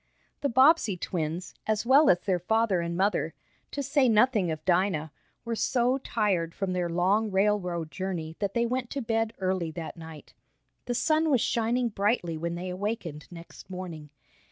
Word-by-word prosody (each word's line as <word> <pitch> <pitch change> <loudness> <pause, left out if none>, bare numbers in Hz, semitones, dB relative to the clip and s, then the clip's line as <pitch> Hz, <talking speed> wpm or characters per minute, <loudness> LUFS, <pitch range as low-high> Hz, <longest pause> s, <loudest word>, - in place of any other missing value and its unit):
The 280 - 0
Bobbsey 260 - +4
twins, 170 0 -3
as 215 +1 0
well 275 +5 +6
as 180 - +4
their 185 -3 0
father 220 0 +1
and 170 0 -3
mother, 185 -4 0 0.3
to 285 - -4
say 275 -1 +3
nothing 215 -4 +3
of 155 -1 -5
Dinah, 175 -4 +1 0.3
were 230 0 -2
so 250 +3 +1
tired 190 -10 -1
from 195 -2 -2
their 180 -1 -1
long 190 +6 +2
railroad 190 -5 0
journey 175 -4 -4
that 200 -1 -2
they 235 0 +2
went 250 0 -2
to 280 - -3
bed 225 0 0
early 185 -3 -1
that 170 0 -7
night. 160 -2 -11 0.5
The 245 - -2
sun 315 +4 +2
was 260 -6 +3
shining 235 +2 +1
brightly 200 -5 0
when 170 +2 -3
they 180 +1 -4
awakened 180 -6 -4
next 170 +1 -12
morning. 175 -5 -7
195 Hz, 170 wpm, -28 LUFS, 170-230 Hz, 0.5 s, well